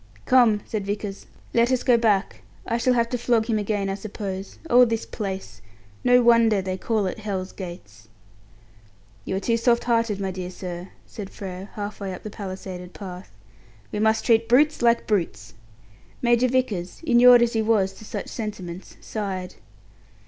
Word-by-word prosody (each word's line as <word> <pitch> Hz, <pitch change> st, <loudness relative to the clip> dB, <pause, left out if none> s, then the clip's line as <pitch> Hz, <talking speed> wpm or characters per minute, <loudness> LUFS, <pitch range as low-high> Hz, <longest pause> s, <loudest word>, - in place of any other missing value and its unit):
"Come," 235 Hz, -5 st, +5 dB
said 215 Hz, -3 st, -3 dB
Vickers, 205 Hz, -1 st, -4 dB, 0.3 s
"Let 235 Hz, +2 st, +3 dB
us 255 Hz, -1 st, +1 dB
go 245 Hz, -, +5 dB
back. 215 Hz, -4 st, +1 dB, 0.2 s
I 230 Hz, -, 0 dB
shall 250 Hz, +1 st, +2 dB
have 235 Hz, -1 st, +2 dB
to 245 Hz, -, -2 dB
flog 235 Hz, -2 st, +2 dB
him 220 Hz, -2 st, 0 dB
again, 205 Hz, -1 st, -1 dB
I 195 Hz, -, -1 dB
suppose. 195 Hz, -2 st, -6 dB
Oh, 250 Hz, -3 st, +7 dB
this 230 Hz, -2 st, 0 dB
place! 190 Hz, -, -6 dB, 0.4 s
No 245 Hz, 0 st, +5 dB
wonder 230 Hz, -3 st, +5 dB
they 185 Hz, -1 st, -3 dB
call 215 Hz, +2 st, -1 dB
it 185 Hz, -, -3 dB
'Hell's 195 Hz, -3 st, -4 dB
Gates'." 110 Hz, -, -10 dB, 1.2 s
"You -, -, -2 dB
are -, -, 0 dB
too 230 Hz, +3 st, +1 dB
soft 235 Hz, 0 st, +2 dB
hearted, 230 Hz, -4 st, +1 dB
my 195 Hz, -1 st, -2 dB
dear 180 Hz, -1 st, -5 dB
sir," 180 Hz, 0 st, -7 dB, 0.2 s
said 200 Hz, -3 st, -8 dB
Frere, 190 Hz, 0 st, -8 dB
half 205 Hz, 0 st, -5 dB
way 195 Hz, -2 st, -4 dB
up -, -, -12 dB
the 215 Hz, -, -6 dB
palisaded 185 Hz, -3 st, -7 dB
path. 185 Hz, -2 st, -8 dB, 0.6 s
"We 210 Hz, -, -3 dB
must 220 Hz, +1 st, +2 dB
treat 230 Hz, 0 st, +3 dB
brutes 295 Hz, +5 st, +4 dB
like 235 Hz, 0 st, +3 dB
brutes." 115 Hz, -, -2 dB, 0.7 s
Major 240 Hz, +1 st, +3 dB
Vickers, 230 Hz, -9 st, -1 dB
inured 245 Hz, -2 st, +7 dB
as 235 Hz, -, 0 dB
he 225 Hz, -, +1 dB
was 210 Hz, -4 st, +2 dB
to 205 Hz, -, -14 dB
such 215 Hz, -, -5 dB
sentiments, 190 Hz, -5 st, -7 dB
sighed. 190 Hz, -4 st, -4 dB
210 Hz, 170 wpm, -24 LUFS, 190-235 Hz, 1.2 s, Oh